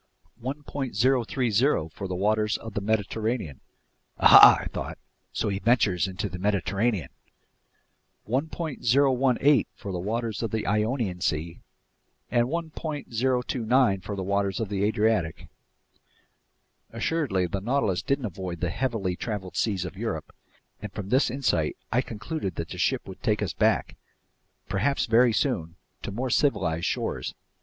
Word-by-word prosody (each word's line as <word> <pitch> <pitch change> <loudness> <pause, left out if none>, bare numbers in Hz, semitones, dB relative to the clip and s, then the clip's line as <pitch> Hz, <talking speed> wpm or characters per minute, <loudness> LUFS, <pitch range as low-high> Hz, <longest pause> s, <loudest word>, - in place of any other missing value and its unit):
030 140 -1 -4 1.0
for 95 - -5
the 90 - -3
waters 105 +3 +1
of 115 -2 -9
the 105 - -2
Mediterranean—" 110 - -1 0.6
Aha, - - +9
I - - -7
thought, - - -5 0.3
so - - -2
he 100 -1 -2
ventures 105 -6 +2
into 95 +2 -3
the 90 -2 -7
Mediterranean? 100 - 0 1.2
"—1.018 135 -1 +2
for 100 - -7
the 90 - -3
waters 110 +3 -2
of 115 - -1
the 110 +1 -2
Ionian 105 -3 0
Sea, 80 +2 -2 0.7
and 120 0 +3
1.029 130 - 0
for 100 +3 -5
the 95 - -3
waters 100 +2 0
of 110 -4 -2
the 100 -1 -1
Adriatic." 105 -6 +1 1.4
Assuredly, 135 - 0
the 95 +3 -3
Nautilus 110 -5 0
didn't 140 -2 -1
avoid 90 -3 -5
the 90 +1 -1
heavily 110 -7 -1
traveled 95 -4 -5
seas 95 -5 0
of 90 - -7
Europe, - - -4 0.5
and 105 - -6
from 100 -1 -6
this 130 +3 +3
insight 120 - 0
I 125 +3 +3
concluded 115 - -5
that 85 - -4
the - - -7
ship - - 0
would - - -10
take - - +1
us - - -2
back—perhaps 135 +9 -2
very 120 +2 +5
soon—to 95 - -3
more 125 +5 -3
civilized 90 - +1
shores. - - -2
110 Hz, 135 wpm, -26 LUFS, 95-125 Hz, 1.4 s, Aha